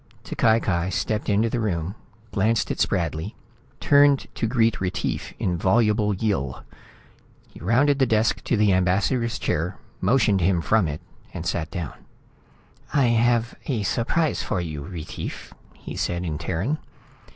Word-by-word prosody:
T'Cai 110 Hz, 0 st, +2 dB
Cai 90 Hz, -4 st, 0 dB
stepped 105 Hz, +3 st, -1 dB
into 105 Hz, +2 st, +3 dB
the 120 Hz, +1 st, -1 dB
room, 90 Hz, -5 st, -1 dB, 0.4 s
glanced 110 Hz, +3 st, +1 dB
at -, -, -4 dB
Spradley, 85 Hz, 0 st, -1 dB, 0.4 s
turned 145 Hz, -1 st, +5 dB
to 115 Hz, -, -1 dB
greet 115 Hz, -2 st, +2 dB
Retief 95 Hz, -1 st, -2 dB
in 90 Hz, -2 st, -1 dB
voluble 105 Hz, +1 st, +2 dB
Yill. 95 Hz, -, -2 dB, 0.8 s
He -, -, -15 dB
rounded 135 Hz, +9 st, +3 dB
the 130 Hz, -, +4 dB
desk 110 Hz, -1 st, +1 dB
to 120 Hz, -, +1 dB
the 105 Hz, -2 st, +4 dB
ambassador's 100 Hz, +6 st, +1 dB
chair, 85 Hz, +5 st, -1 dB, 0.2 s
motioned 110 Hz, -7 st, +3 dB
him 90 Hz, 0 st, +3 dB
from 100 Hz, +2 st, +2 dB
it 75 Hz, 0 st, -5 dB, 0.3 s
and -, -, -5 dB
sat 80 Hz, -2 st, -1 dB
down. 80 Hz, -1 st, -5 dB, 1.0 s
"I 140 Hz, -3 st, +3 dB
have 120 Hz, 0 st, +2 dB
a 120 Hz, -7 st, -1 dB
surprise 140 Hz, -, 0 dB
for 105 Hz, -, -2 dB
you, 80 Hz, -4 st, -4 dB
Retief," 80 Hz, +1 st, -7 dB, 0.2 s
he -, -, -9 dB
said, 90 Hz, 0 st, -1 dB
in 75 Hz, -3 st, -3 dB
Terran. 95 Hz, -, -1 dB
105 Hz, 145 wpm, -24 LUFS, 90-115 Hz, 1.0 s, turned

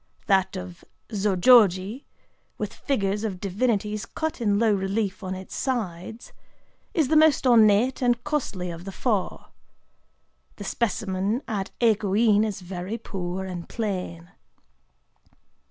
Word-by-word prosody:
That 190 Hz, 0 st, +2 dB
of 180 Hz, -1 st, -8 dB, 0.3 s
Zōjōji,—with 205 Hz, -, +1 dB
figures 205 Hz, -6 st, -1 dB
of 195 Hz, -5 st, -3 dB
divinities 210 Hz, 0 st, -1 dB
cut 315 Hz, -3 st, -4 dB
in 205 Hz, -3 st, +2 dB
low 220 Hz, -1 st, +3 dB
relief 195 Hz, +1 st, -2 dB
on 185 Hz, 0 st, -3 dB
its 190 Hz, 0 st, -9 dB
sides,—is 235 Hz, -, -4 dB
the 315 Hz, -, +1 dB
most 310 Hz, -2 st, +5 dB
ornate 230 Hz, +1 st, +4 dB
and 245 Hz, -1 st, +1 dB
costly 210 Hz, -12 st, -2 dB
of 170 Hz, +1 st, -9 dB
the 195 Hz, -, -5 dB
four. 205 Hz, -2 st, -2 dB, 1.1 s
The 205 Hz, -, -8 dB
specimen 205 Hz, +1 st, -1 dB
at 200 Hz, -3 st, -3 dB
Ekō 210 Hz, -4 st, +2 dB
In 215 Hz, -2 st, +4 dB
is 210 Hz, -3 st, -3 dB
very 180 Hz, +4 st, -5 dB
poor 190 Hz, -4 st, -5 dB
and 180 Hz, -2 st, -7 dB
plain. 180 Hz, -6 st, -4 dB
205 Hz, 120 wpm, -25 LUFS, 190-230 Hz, 1.1 s, most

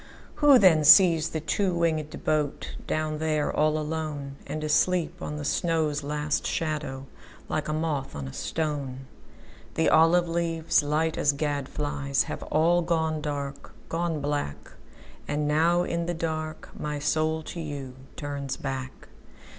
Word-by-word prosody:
Who 290 Hz, -3 st, +7 dB
then 175 Hz, -8 st, +5 dB
sees 165 Hz, 0 st, +7 dB
the 160 Hz, -, -3 dB
two 180 Hz, +4 st, 0 dB
wingedBoat 155 Hz, -3 st, -1 dB, 0.2 s
down 155 Hz, -1 st, -1 dB
there, 155 Hz, -2 st, 0 dB
all 155 Hz, 0 st, +3 dB
aloneAnd 155 Hz, -1 st, -4 dB
asleep 170 Hz, +3 st, +1 dB
on 150 Hz, -, -4 dB
the 145 Hz, -, -5 dB
snow's 155 Hz, -2 st, 0 dB
last 150 Hz, +1 st, -1 dB
shadow, 150 Hz, -4 st, -3 dB, 0.4 s
Like 155 Hz, -, -2 dB
a 155 Hz, -, -1 dB
moth 155 Hz, -4 st, -2 dB
on 70 Hz, -2 st, -5 dB
a 65 Hz, -, -8 dB
stone? 140 Hz, -5 st, -3 dB, 0.7 s
The 160 Hz, -, +3 dB
olive 170 Hz, +2 st, +5 dB
leaves, 165 Hz, -1 st, +1 dB
light 155 Hz, +2 st, 0 dB
as 145 Hz, -, +3 dB
gad 145 Hz, -2 st, -2 dB
flies, 140 Hz, -2 st, -1 dB
Have -, -, -6 dB
all 170 Hz, +3 st, +2 dB
gone 160 Hz, -2 st, 0 dB
dark, 145 Hz, -2 st, -5 dB, 0.2 s
gone 165 Hz, -2 st, -1 dB
black. 145 Hz, -, -3 dB, 0.6 s
And 150 Hz, 0 st, -1 dB
now 165 Hz, +4 st, +3 dB
in 170 Hz, -1 st, -2 dB
the 175 Hz, -, -1 dB
dark 155 Hz, -1 st, -4 dB
my 150 Hz, -1 st, -3 dB
soul 155 Hz, +2 st, 0 dB
to 170 Hz, -, -7 dB
youTurns 140 Hz, -1 st, -6 dB
back. 130 Hz, -1 st, -5 dB
155 Hz, 140 wpm, -27 LUFS, 145-160 Hz, 0.7 s, Who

